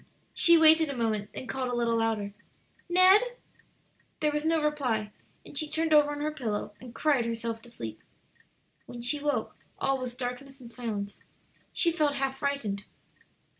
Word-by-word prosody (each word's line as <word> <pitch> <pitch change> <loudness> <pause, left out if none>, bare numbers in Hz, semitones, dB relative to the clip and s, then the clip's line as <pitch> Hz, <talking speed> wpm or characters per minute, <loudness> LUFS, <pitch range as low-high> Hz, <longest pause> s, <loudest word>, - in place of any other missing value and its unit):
She 340 0 +6
waited 320 -1 +6
a 275 - -4
moment, 215 -3 -1
then - - -7
called 260 -1 -3
a - - -1
little 235 -1 +1
louder, 220 -3 -1 0.6
"Ned!" 370 +3 +7 1.0
There 300 -1 +2
was 295 0 -2
no 325 0 +3
reply, 250 -8 0 0.3
and - - -12
she 305 +1 0
turned 320 0 0
over 295 -1 +6
on 290 0 -4
her 305 +1 -1
pillow, 215 -7 -3
and 245 -1 -11
cried 280 -6 +2
herself 230 0 -3
to 240 - -13
sleep. 115 - -8 0.9
When 240 -1 -8
she 290 +5 +2
woke 290 0 -1 0.2
all 270 0 0
was 250 -1 -5
darkness 260 +2 -6
and 235 -2 -12
silence. 210 -5 -5 0.5
She 340 - +3
felt 305 -4 +1
half 270 -1 -2
frightened. 255 -9 -2
265 Hz, 170 wpm, -28 LUFS, 230-300 Hz, 1.0 s, Ned